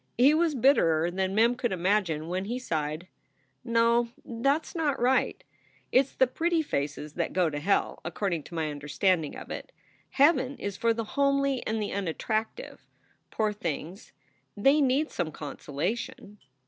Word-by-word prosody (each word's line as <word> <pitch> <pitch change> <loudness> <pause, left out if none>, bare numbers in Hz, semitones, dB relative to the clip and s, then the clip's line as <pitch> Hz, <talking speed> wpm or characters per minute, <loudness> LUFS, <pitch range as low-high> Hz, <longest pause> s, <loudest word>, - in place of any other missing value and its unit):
He 265 +5 +6
was 320 -1 +2
bitterer 175 - +3
than 190 +1 -1
Mem 230 +3 +4
could 240 -2 -2
imagine 180 -4 0
when 185 +2 -2
he 240 +4 -3
sighed: 155 -7 -3 0.6
"No, 235 0 +2 0.2
that 275 +6 +1
s - - -12 0.2
right. 255 +2 +1 0.5
It - - +6
s 270 0 -1
the 260 - +4
pretty 325 +5 0
faces 145 - -3
that 170 0 -2
go 175 -3 +2
to 145 - -3
hell, 195 +7 0
according 185 -6 -2
to 170 - -10
my 160 -2 -1
understanding 150 +3 0
of - - -9
it. - - -6 0.4
Heaven 280 -2 +3
is 200 -1 -4
for 230 +3 +2
the 230 0 -1
homely 275 +2 +1
and 220 +1 -1
the 210 - -2
unattractive. 215 - -3 0.4
Poor 215 -1 0
things, 175 - -5 0.5
they 275 +8 +4
need 275 +3 +2
some 170 -3 -2
consolation." 170 +8 -5
210 Hz, 155 wpm, -28 LUFS, 170-255 Hz, 0.6 s, He